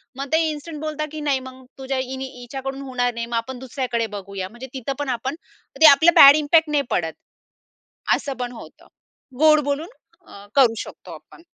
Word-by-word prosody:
मग 275 +2 -5
ते 320 - +4
इन्स्टंट 300 0 -7
बोलतात, 305 0 -3
की 310 - -7
"नाही, 270 - +2
मग 260 0 -13
तुझ्या 270 0 -3
हिनी 260 +1 -4
हिच्याकडून 270 +2 -6
होणार 245 -2 -2
नाही 235 0 -4
मग 235 0 -5
आपण 245 +2 -5
दुसऱ्याकडे 250 -3 -3
बघूया" 195 -1 -6
म्हणजे 240 +4 -10
तिथं 265 +1 -4
पण 285 -2 -3
आपण 265 +3 -4 0.5
ते - - +9
आपलं 325 +5 +5
बॅड 280 +1 +10
इम्पॅक्ट 310 +1 +3
नाही 290 -2 +1
पडत, 160 -2 -1 1.0
असं 275 - -5
पण 245 -1 -3
होतं. 235 - -13 0.5
गोड 305 0 +6
बोलून 285 +4 -2 0.7
करू 260 -5 +6
अ, - - -10
शकतो - - -11
आपण. 335 - -17
270 Hz, 180 wpm, -22 LUFS, 245-295 Hz, 1.0 s, बॅड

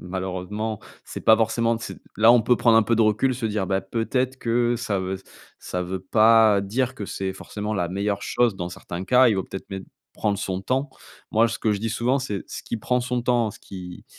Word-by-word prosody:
malheureusement, 95 +4 -4 0.2
c'est - - -7
pas 110 - +7
forcément 115 +1 +1
d 115 - -10
c'est - - -7 0.2
là, 115 +2 +7
on 120 -2 +5
peut 125 +1 +3
prendre 115 -2 +4
un 115 - +6
peu 115 +1 +1
de 115 - +4
recul, 110 +5 +2
se 115 -2 -2
dire: 105 -3 -1
«Bah, 95 +1 0
peut-être 125 +5 -2
que 120 0 +1
ça 110 -4 -2
veut 95 0 -3 0.4
ça 90 0 -3
veut 95 +1 -4
pas 110 +1 +5
dire 125 +6 -1
que 105 - -5
c'est 95 -1 -3
forcément 105 +2 -5
la 90 -3 -1
meilleure 100 +2 -2
chose. 120 -5 +1
Dans 90 -1 -4
certains 90 +1 -7
cas, 125 +3 +5
il 110 - +2
vaut 95 - -1
peut-être 95 - -9
même 95 -1 -5 0.3
prendre 105 -2 -1
son 95 -2 -3
temps». 130 +7 -1 0.4
Moi, 115 +2 +4
ce 115 - -4
que 110 - +1
je 100 - -1
dis 115 +2 -2
souvent, 125 +5 +1
c'est: 105 -8 -4
«Ce - - -7
qui - - -3
prend 125 +3 0
son 125 0 -2
temps, 120 -3 +1
ce - - -15
qui 90 -2 -9
110 Hz, 235 wpm, -24 LUFS, 95-120 Hz, 0.4 s, pas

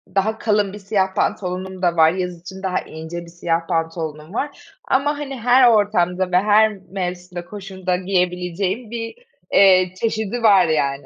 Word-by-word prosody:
daha 215 +3 +1
kalın 210 -3 0
bir 210 - -8
siyah 195 -1 -1
pantolonum 185 0 -2
da 175 -2 +1
var, 160 -1 +5
yaz 180 -1 -4
için 190 +2 -10
daha 185 -1 0
ince 160 +2 -8
1 - - -13
siyah 170 -1 -2
pantolonum 160 0 -3
var 285 +5 -6
ama, 290 +2 +1
hani, 275 -3 -6
her 245 +2 +5
ortamda 185 -4 +1
ve 180 - +4
her 210 +3 +4 0.2
mevsimde, 180 -1 -5
koşulda 190 -2 -4
giyebileceğim 180 +3 -1
bir, 230 - -5 0.4
eee, 185 -2 +5
çeşidi 220 +2 -2
var, 200 -5 +6
yani. 140 -3 0
185 Hz, 155 wpm, -20 LUFS, 175-210 Hz, 0.4 s, var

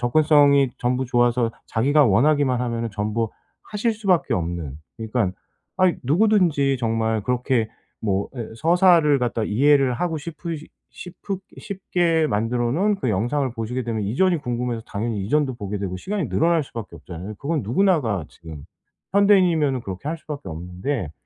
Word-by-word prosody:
접근성이 140 0 +4
전부 125 +2 0
좋아서 120 -1 +2 0.2
자기가 145 +6 +3
원하기만 130 +3 +3
하면은 115 -2 -2
전부 105 +2 -2 0.3
하실 215 +2 -1
수밖에 195 -6 +1
없는 85 -5 -3 0.2
그러니까 110 -3 -1 0.5
아이 185 -3 +3
누구든지 160 - +3
정말 110 -2 0
그렇게 125 -1 0 0.3
뭐 100 -2 -1
예 115 - -5
서사를 165 -1 +4
갖다가 120 -3 -1
이해를 135 +3 +3
하고 165 +3 -2
싶으시 160 0 -7 0.2
싶으 185 +2 -7 0.2
싶게 175 -4 0
만들어 120 +1 0
놓은 200 +6 +1
그 160 - -2
영상을 120 +7 0
보시게 120 +2 -3
되면 110 -2 -3
이전이 170 - +1
궁금해서 120 -4 -3
당연히 105 -1 -3
이전도 140 +3 +1
보게 105 -2 -5
되고 95 -2 -4
시간이 195 - -3
늘어날 165 -1 +2
수밖에 110 -9 -8
없잖아요. 90 +6 -8
그건 150 -2 -2
누구나가 120 - +1
지금 80 -4 -11 0.5
현대인이면은 180 -10 +4
그렇게 95 +7 -6
할 165 +1 -3
수밖에 145 - -7
없는데. 90 - -4
125 Hz, 370 characters per minute, -22 LUFS, 110-160 Hz, 0.5 s, 접근성이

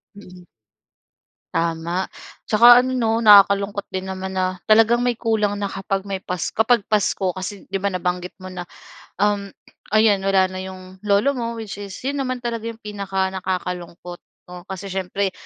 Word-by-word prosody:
Mm. 180 -3 -14 1.1
Tama. 170 +2 -1 0.4
Tsaka 240 +3 +7
ano 260 - -2
'no, 230 -2 0
nakakalungkot 200 -1 +5
din 185 0 -4
naman 190 0 -5
na, 185 0 -1
talagang 225 +2 +5
may 245 0 +1
kulang 215 -3 0
na 200 -1 -3
kapag 195 0 -3
may 195 -1 -4
pas 180 -2 -4
kapag 225 0 +2
Pasko 195 -3 +1
kasi, 190 +2 -6
'di 195 - -1
ba, 200 - -1
nabanggit 180 -1 -3
mo 185 - -7
na, 175 -1 -7 0.5
um, 205 -1 +1 0.5
ayan 215 -2 +5
wala 190 -1 +3
na 185 - -6
'yong 185 0 -10
lolo 205 +8 +3
mo 235 -1 -3
which 205 -2 -7
is 200 -2 -7
'yon 280 +2 -2
naman 255 -1 -2
talaga 230 -1 -3
'yong 230 -1 -7
pinakanakakalungkot 190 -3 -4 0.3
'no? 180 0 -9
Kasi 190 +1 -6
siyempre 190 +1 -2
195 Hz, 160 wpm, -21 LUFS, 185-215 Hz, 1.1 s, Tsaka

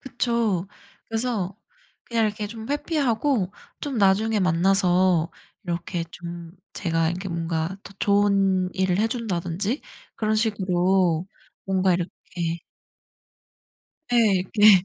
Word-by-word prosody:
그쵸. 235 -7 0 0.4
그래서 220 -5 -2 0.5
그냥 230 -2 +1
이렇게 210 0 -3
좀 220 +1 -8
회피하고 275 - 0 0.3
좀 275 -5 -3
나중에 210 +2 +3
만나서 180 -1 +3 0.3
이렇게 170 0 -3
좀 170 -1 -8 0.2
제가 165 -3 0
이렇게 185 +3 -4
뭔가 165 +1 -2
더 - - -11
좋은 195 -2 +3
일을 190 -1 +1
해준다든지 210 - -1 0.3
그런 215 0 +1
식으로 185 -5 +2 0.4
뭔가 190 -1 +2
이렇게 170 -1 -3 1.5
네. 215 -6 +4
네. 205 -3 +8
195 Hz, 220 characters per minute, -24 LUFS, 175-220 Hz, 1.5 s, 네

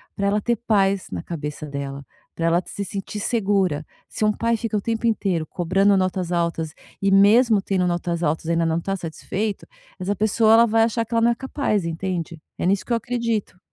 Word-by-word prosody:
pra 200 -1 0
ela 205 +1 +1
ter 235 +3 +1
paz 200 -4 +1
na 90 -2 -4
cabeça 150 -2 -5
dela, 140 -1 -6 0.3
pra 165 - -2
ela 170 +1 +3
se 200 - -5
sentir 200 +2 -5
segura. 195 -8 +1 0.2
Se - - -4
um 215 - +4
pai 230 +2 0
fica 220 -1 -2
o 205 - -1
tempo 230 +1 -1
inteiro 190 -8 0
cobrando 195 +3 +2
notas 185 -1 -1
altas, 170 -2 -1 0.3
e 195 - +2
mesmo 210 +2 +5
tendo 185 -2 0
notas 175 -1 -1
altas 160 0 0
ainda 170 0 +1
não 165 0 +1
tá 195 +3 -2
satisfeito, 195 +4 -4 0.3
essa 195 +3 -1
pessoa 215 +2 +3
ela 230 +1 +7
vai 225 0 +3
achar 230 0 +1
que 230 - -9
ela 230 - +3
não 235 +1 +4
é - - 0
capaz, 265 -5 -1
entende? 170 -1 -3 0.2
É - - -1
nisso 190 +2 +1
que - - -9
eu - - +3
acredito. 230 -5 -2
195 Hz, 205 wpm, -23 LUFS, 170-220 Hz, 0.3 s, ela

